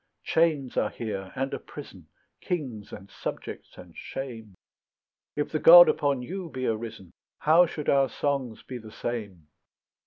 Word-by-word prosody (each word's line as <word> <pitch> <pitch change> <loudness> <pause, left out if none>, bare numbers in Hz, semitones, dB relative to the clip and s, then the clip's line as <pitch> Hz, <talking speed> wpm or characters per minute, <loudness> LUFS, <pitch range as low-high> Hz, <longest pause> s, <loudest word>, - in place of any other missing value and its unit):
Chains 155 -6 +1
are - - +2
here, 100 -5 -5
and 135 +1 -2
a - - -3
prison, 95 - -11 0.3
Kings, 130 - -4
and 95 +1 -10
subjects, - - -7
and - - -13
shame; 115 -7 -7 0.8
If 150 - -2
the 155 - 0
God 175 +2 +10
upon 140 -4 +1
you 180 +4 -6
be 130 -3 -4
arisen, 110 -5 -4 0.3
How 165 +3 +5
should 150 -2 -6
our 135 -1 +4
songs 135 -6 -2
be 125 -1 -7
the 110 -1 -11
same? 105 -9 -5
130 Hz, 150 wpm, -27 LUFS, 110-150 Hz, 0.8 s, God